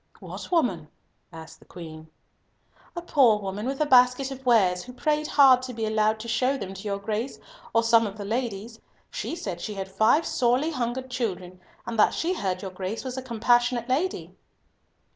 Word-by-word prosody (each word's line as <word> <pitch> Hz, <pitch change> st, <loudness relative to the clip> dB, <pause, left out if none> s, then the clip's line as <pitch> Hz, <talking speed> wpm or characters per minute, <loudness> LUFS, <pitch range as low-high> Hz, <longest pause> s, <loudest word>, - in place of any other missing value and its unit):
"What -, -, -9 dB
woman?" 230 Hz, -, +1 dB, 0.4 s
asked 160 Hz, -1 st, -11 dB
the -, -, -20 dB
Queen. 160 Hz, -2 st, -10 dB, 0.9 s
"A 345 Hz, -, -5 dB
poor 260 Hz, -10 st, +4 dB
woman 205 Hz, +2 st, -5 dB
with 270 Hz, +1 st, -3 dB
a -, -, +3 dB
basket 255 Hz, 0 st, +4 dB
of 265 Hz, 0 st, -8 dB
wares, 190 Hz, -7 st, +4 dB
who 250 Hz, -, -11 dB
prayed 300 Hz, +3 st, -1 dB
hard 270 Hz, -5 st, +6 dB
to 255 Hz, -1 st, -7 dB
be 225 Hz, -1 st, -2 dB
allowed 215 Hz, 0 st, +1 dB
to 235 Hz, -, -8 dB
show 255 Hz, +4 st, +1 dB
them 195 Hz, -6 st, -6 dB
to 195 Hz, -, -9 dB
your 200 Hz, -1 st, -3 dB
Grace 215 Hz, +5 st, -4 dB, 0.3 s
or 230 Hz, -, +2 dB
some 230 Hz, -1 st, +4 dB
of 200 Hz, +1 st, -8 dB
the 205 Hz, -, -6 dB
ladies. 225 Hz, 0 st, -4 dB, 0.3 s
She -, -, -4 dB
said 185 Hz, -, -6 dB
she 210 Hz, -, -5 dB
had 195 Hz, -1 st, -5 dB
five 220 Hz, +11 st, +3 dB
sorely 255 Hz, +6 st, +1 dB
hungered 255 Hz, -1 st, -3 dB
children, 185 Hz, -7 st, -4 dB, 0.2 s
and 230 Hz, -2 st, -4 dB
that -, -, +4 dB
she 345 Hz, +3 st, -1 dB
heard 190 Hz, -, -3 dB
your 190 Hz, -, -5 dB
Grace 190 Hz, +4 st, -5 dB
was 255 Hz, -1 st, -5 dB
a 260 Hz, -, -4 dB
compassionate 240 Hz, 0 st, +1 dB
lady." 320 Hz, +9 st, -1 dB
230 Hz, 190 wpm, -25 LUFS, 200-260 Hz, 0.9 s, hard